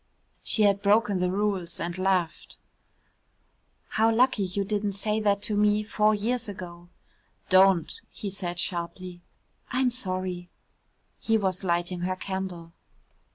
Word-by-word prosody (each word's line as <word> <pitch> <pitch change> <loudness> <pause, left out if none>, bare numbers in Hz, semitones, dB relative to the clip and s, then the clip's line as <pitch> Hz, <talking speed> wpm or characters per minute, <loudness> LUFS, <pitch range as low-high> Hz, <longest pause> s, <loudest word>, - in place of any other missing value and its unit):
She 215 - +2
had 200 -1 +3
broken 205 -1 +3
the 180 0 +1
rules 195 -3 -1
and 170 +1 -3
laughed. 185 -3 -1 1.3
"How 225 +1 +3
lucky 245 -1 +3
you 190 +2 -2
didn't 205 0 -1
say 210 +2 -1
that 205 -1 +1
to 210 - 0
me 210 0 +3
four 215 0 +2
years 230 +2 -2
ago." 175 -3 -9 0.6
"Don't," 185 -3 +4
he 200 - -6
said 175 -3 -5
sharply. 175 0 -4 0.5
"I'm 255 0 +1
sorry." 185 -6 -2 0.7
He 225 0 +2
was 190 -3 -1
lighting 175 0 -1
her 185 +1 -1
candle. 185 -3 -5
195 Hz, 130 wpm, -27 LUFS, 180-210 Hz, 1.3 s, Don't